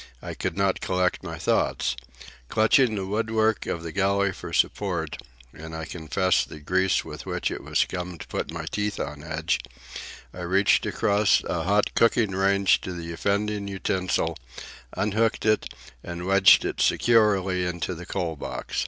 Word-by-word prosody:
I - - -7
could - - -4
not 100 -1 +1
collect 90 -1 0
my - - -6
thoughts. 65 - 0 0.5
Clutching 110 +2 +3
the 95 -2 -3
woodwork 110 +1 0
of 85 - -3
the 85 - -5
galley 100 +2 +1
for 90 -2 -8
support,—and 80 -6 -3
I 80 0 -5
confess 90 +3 0
the 75 - -10
grease 95 +5 +1
with - - -9
which - - -2
it - - -5
was - - -2
scummed 90 -2 -2
put - - -3
my 80 -1 -5
teeth 105 +4 -2
on 75 +1 -5
edge,—I 80 -2 -5
reached 95 +3 +2
across 100 0 +2
a 80 -2 -2
hot 100 +2 +2
cooking 115 -2 +3
range 100 +1 +3
to 90 - -5
the 85 -1 -6
offending 100 +3 -1
utensil, 95 -1 -1 0.6
unhooked 105 +4 0
it, 110 -1 +1 0.3
and 85 0 -6
wedged 95 0 +6
it - - -2
securely 100 -6 +3
into 90 0 -3
the 90 +1 -9
coal 85 -5 -2
box. 70 - -6
95 Hz, 155 wpm, -25 LUFS, 85-100 Hz, 0.6 s, wedged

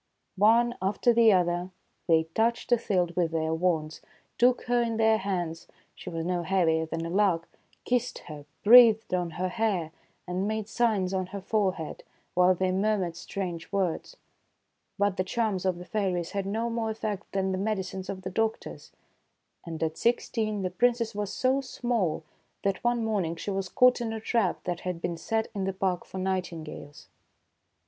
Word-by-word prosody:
One 230 +4 +4
after 205 +5 +2
the 230 -1 +6
other 175 -1 +1 0.4
they 160 -2 +4
touched 235 +2 0
Othilde 185 -7 +1
with 175 -2 +1
their 160 0 -1
wands, 160 -2 -1 0.4
took 245 +1 +4
her 245 0 +2
in 230 -1 -1
their 220 -1 +4
hands, 175 -4 -3
— - - -38
she - - -8
was 165 -1 -4
no 180 0 0
heavier 165 -3 +1
than 165 +1 -4
a - - -4
lark, 185 -4 +2 0.2
— - - -36
kissed 250 0 0
her, 150 -3 -9 0.2
breathed 225 -2 +7
on 180 -2 0
her 185 +1 -1
hair, 190 -6 -1 0.4
and 185 +3 -1
made 215 -1 -2
signs 215 -6 +1
on 185 -1 -1
her 200 +2 -6
forehead, 190 -5 -1 0.3
while 180 +1 +4
they 185 +1 0
murmured 190 -3 0
strange 175 -2 -5
words. 195 - -2 0.8
But 200 -1 +1
the 185 - +1
charms 200 -1 -1
of 185 -2 +1
the 180 - -9
fairies 185 -5 -1
had 200 -1 -2
no 225 +4 -1
more 230 -1 -1
effect 215 -3 -4
than 190 -1 0
the 185 - -2
medicines 190 -2 -3
of 190 -1 -5
the 185 - -4
doctors; 225 +3 -3 0.8
and 165 -1 -4
at 160 0 -2
sixteen 220 -3 0
the 185 - -2
Princess 235 +2 +1
was 205 -1 -3
so 260 +2 +1
small 235 - -1 0.4
that 195 -1 -1
one 240 -1 +1
morning 190 -7 -1
she 170 +5 -4
was 195 -1 -2
caught 250 +4 +4
in 225 -2 -2
a 220 - -4
trap 220 -4 0
that 175 -1 -3
had 180 -2 -4
been 170 0 -2
set 220 +6 -2
in 195 -2 -2
the 195 - -1
park 185 -2 -1
for - - -9
nightingales. 175 -6 -4
190 Hz, 180 wpm, -28 LUFS, 175-220 Hz, 0.8 s, breathed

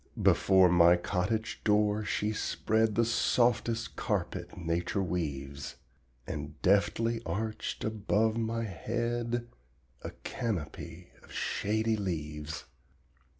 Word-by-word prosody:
Before 95 -1 +5
my 85 0 +6
cottage 100 +5 -1
door 105 0 +3
she 105 +1 -1
spread 110 0 +1
The 115 - +3
softest 115 0 +1
carpet - - -2
nature 85 +3 -1
weaves, 70 -6 -3 0.5
And 75 0 -6
deftly 105 +4 +2
arched 110 0 -3
above 110 0 +1
my 115 0 -1
head 120 +4 -2 0.5
A - - -5
canopy 90 -5 -4
of - - -17
shady 110 +2 0
leaves. 75 -5 -4
105 Hz, 100 wpm, -31 LUFS, 85-115 Hz, 0.5 s, my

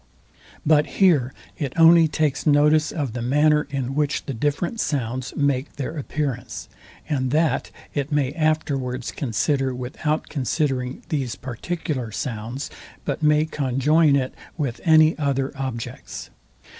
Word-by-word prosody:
But 150 -1 +4
here 155 -10 +4 0.3
it 140 -4 -2
only 165 0 +7
takes 155 -1 0
notice 150 +1 +4
of 140 -8 -3
the 120 - -4
manner, 150 +4 +3
in 135 -2 -2
which 150 0 0
the 135 - -3
different 145 - -1
sounds 130 - -2
make 140 -1 0
their 145 +3 -4
appearance; 140 -4 -3 0.4
and 130 -3 0
that 155 +4 +1 0.2
it 145 +1 -2
may 145 -2 +1
afterwards 140 -6 -1
consider 135 +1 0
without 150 +5 -2
considering 135 -2 -1
these 135 -6 -1
particular 130 -1 -4
sounds, 120 +3 -4 0.3
but - - -2
may 150 0 +4
conjoin 150 +1 +2
it 130 -2 0 0.2
with 135 -7 -2
any 160 -1 +6
other 140 -1 0
objects. 130 -4 -6
140 Hz, 130 wpm, -23 LUFS, 130-155 Hz, 0.4 s, only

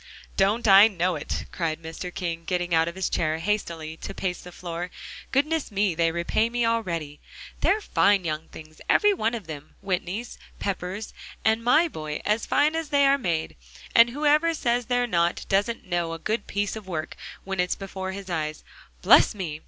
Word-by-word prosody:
"Don't 210 +4 +2
I 200 +2 +9
know 180 -3 0
it?" - - -4
cried 165 -2 -2
Mr. 165 +2 -7
King, 170 -3 -4
getting 175 0 -1
out 165 0 +4
of 170 - -4
his 190 -1 -1
chair 155 -1 0
hastily 165 -4 -2
to 195 - -7
pace 180 -2 -3
the 180 - -11
floor. 175 0 -5 0.4
"Goodness 305 +3 +1
me! 200 -3 +1
they 165 0 +2
repay 170 +7 0
me 240 0 0
already. 170 -10 -2 0.4
They're 425 +2 +2
fine 200 - +3
young 155 0 -3
things, 155 0 -13
every 415 -1 +5
one 235 - 0
of 220 -5 -7
them 150 -2 -9
Whitneys, 195 +4 -3 0.2
Peppers 195 +1 -4 0.3
and 220 +1 +3
my 305 +8 +5
boy 155 - -5
as 210 +2 0
fine 300 +2 +3
as 325 -2 -3
they 285 -1 +4
are 275 +1 +4
made. 170 -8 -2 0.4
And 230 +1 +7
whoever 300 +5 +2
says 240 -4 0
they're 245 -1 +2
not, 170 -6 0
doesn't 205 +4 0
know 175 -2 -1
a - - -4
good 215 +5 -2
piece 205 +1 -1
of 215 -3 -9
work 155 -4 -4 0.3
when 195 -1 -4
it's 180 0 +1
before 190 -1 -5
his 195 0 -7
eyes. 155 -3 -3 0.4
Bless - - +6
me!" 165 -7 -4
190 Hz, 185 wpm, -25 LUFS, 170-230 Hz, 0.4 s, I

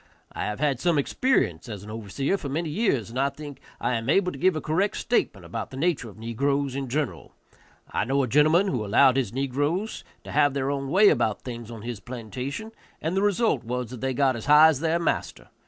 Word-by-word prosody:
I - - -4
have 105 +2 -4
had 140 -4 +1
some 170 0 +2
experience 135 - 0
as 105 -3 -7
an 105 - -9
overseer 115 - -2
for 160 -7 -5
many 160 +4 -2
years, 140 - 0
and 125 - -3
I 140 +1 +2
think 145 -1 -10 0.2
I - - 0
am 115 +1 -2
able 180 +3 +3
to - - -9
give 185 -1 +3
a - - -1
correct 175 +8 0
statement 105 - -1
about 105 +4 -5
the 130 - -9
nature 150 -6 0
of 105 - -15
negroes 135 +4 -1
in 135 -1 -3
general. 145 0 -3 0.6
I - - 0
know 135 +3 +1
a - - -1
gentleman 155 - +4
who 125 - -1
allowed 125 +6 +4
his 130 -7 0
negroes 145 - -2 0.2
to - - -9
have 145 -1 +3
their 135 0 0
own 140 -1 -3
way 200 +6 +6
about 115 -7 0
things 120 -3 -7
on 115 -3 -9
his 120 -3 -5
plantation, 125 - -6 0.3
and 160 +4 -2
the 195 - +2
result 205 - +1
was 125 0 -4
that 125 - -8
they 130 -1 -1
got 135 -1 +2
as 115 - -7
high 150 +2 +8
as 150 -5 0
their 165 +1 +1
master. 170 - -2
135 Hz, 225 wpm, -25 LUFS, 120-155 Hz, 0.6 s, high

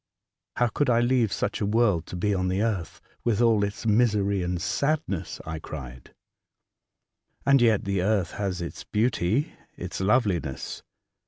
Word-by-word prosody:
'' - - -63
How 120 - +4
could 145 +4 0
I 115 -1 +4
leave 120 -3 +2
such 105 - -2
a - - +2
world 105 -6 +2
to - - -7
be 105 +4 0
on 95 -1 0
the 95 +3 0
earth, 100 -7 -2 0.2
with 115 -4 +1
all 115 -3 +4
its 100 +3 -4
misery 105 -3 +2
and 90 0 -2
sadness? 100 - -1
" - - -22
I 80 0 -4
cried. 65 -6 -9 0.7
'' - - -45
And 140 -2 +5
yet 110 -5 +3
the 100 -2 0
earth 95 -2 +1
has 95 -3 -3
its 85 - -7
beauty, 115 - 0 0.2
its - - -5
loveliness. 95 - 0
100 Hz, 170 wpm, -26 LUFS, 90-115 Hz, 0.7 s, And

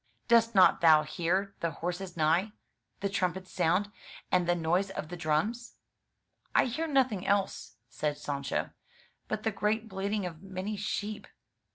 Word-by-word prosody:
" - - -43
Dost 230 -1 +4
not 185 - +6
thou 155 -2 +7
hear 185 +5 -1
the 170 - 0
horses 175 +3 -5
neigh, 170 +7 +2 0.5
the 200 - +1
trumpets 185 -1 -2
sound, 185 +4 +1 0.4
and 180 -1 +2
the 175 - +4
noise 175 +4 +1
of 155 -5 -6
the 175 - -5
drums?" 175 +9 -1 0.8
"I - - +5
hear 315 +7 -2
nothing 255 - +1
else,'* 195 - 0
said 145 +4 -2
Sancho, 140 -2 -3 0.6
*'but 215 0 -3
the 220 - +1
great 215 +2 -1
bleating 200 0 -2
of 165 -2 -7
many 195 +2 -4
sheep." 210 0 -4
190 Hz, 155 wpm, -30 LUFS, 170-210 Hz, 0.8 s, thou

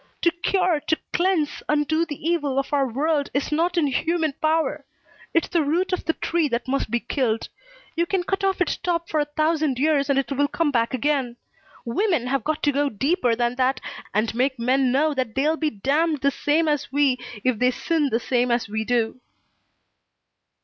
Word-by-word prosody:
To 340 - +5
cure, 350 -1 +1
to 315 - +2 0.2
cleanse, 350 -4 +1
undo 300 +2 +1
the 295 - -6
evil 295 -6 0
of 275 +1 -1
our 275 -2 +2
world 285 +4 0
is 280 - -1
not 340 +3 +1
in 325 - +3
human 315 +3 0
power. 310 -2 +1 0.5
It's 330 - +1
the 340 - +2
root 340 +6 0
of 365 - -2
the 325 - +1
tree 330 -1 0
that 235 -1 -2
must 270 -3 -1
be 240 +2 0
killed. 235 -2 -1 0.5
You 340 +1 +1
can 375 -1 0
cut 390 +2 -2
off 385 -1 +1
its 360 - +1
top 340 -1 -2
for 310 - 0
a 295 - +2
thousand 310 -4 +1
years 285 0 +2
and 280 - +3
it 275 -2 -1
will 285 +1 +2
come 320 0 0
back 235 0 +1
again. 260 -2 -1 0.5
Women 335 - 0
have 270 +2 -1
got 310 0 -2
to 290 - +3
go 285 +1 +1
deeper 265 - +1
than 240 +1 -1
that 260 +1 +1 0.3
and 215 +2 0
make 260 +3 0
men 255 +2 +2
know 300 +4 +2
that 255 -5 -3
they'll 300 +4 +2
be 315 -1 0
damned 295 +7 0
the 280 - +3
same 305 +4 +1
as 295 -4 -1
we 275 -2 +2 0.2
if 255 -4 +1
they 250 - +4
sin 300 +3 0
the 230 -1 +1
same 245 +1 0
as 235 -1 +1
we 220 +2 -2
do." 235 +1 -1
290 Hz, 200 wpm, -23 LUFS, 255-325 Hz, 0.5 s, To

